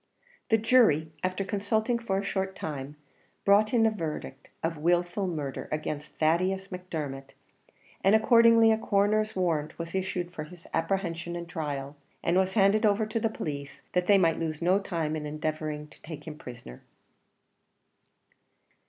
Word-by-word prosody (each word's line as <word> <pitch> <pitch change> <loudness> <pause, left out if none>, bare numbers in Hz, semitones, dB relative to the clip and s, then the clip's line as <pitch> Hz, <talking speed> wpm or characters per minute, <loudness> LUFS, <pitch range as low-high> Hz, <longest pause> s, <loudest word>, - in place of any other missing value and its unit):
The 225 - +5
jury, 215 - +4
after 185 +1 -1
consulting 220 +4 0
for 200 -5 -1
a 195 - -1
short 190 -1 -2
time, 145 -3 -5 0.5
brought 205 +2 +5
in 230 -2 +4
a 220 - +4
verdict 155 -8 -5
of 165 0 0
wilful 175 +4 +1
murder 150 -6 -4
against 150 -1 -4
Thaddeus 185 +5 +1
Macdermot; 150 -7 -6 0.7
and, 195 +3 +6
accordingly, 230 0 +6
a 220 - +2
coroner's 215 +1 +1
warrant 165 -5 -1
was 170 0 -6
issued 185 -2 -2
for 155 -3 -5
his 170 +1 -14
apprehension 170 0 -1
and 170 0 -5
trial, 145 -4 -4 0.3
and 170 - +2
was 190 0 +2
handed 210 +1 +4
over 215 0 +3
to 220 +2 -2
the 225 - +1
police, 140 -8 -6
that 180 0 +1
they 205 - +7
might 165 -4 +3
lose 155 -2 -3
no 180 +4 +3
time 165 -6 -2
in 150 -1 -4
endeavouring 155 0 -3
to - - -19
take 155 -2 -9
him 155 - -7
prisoner. 120 - -10
175 Hz, 155 wpm, -28 LUFS, 155-200 Hz, 0.7 s, they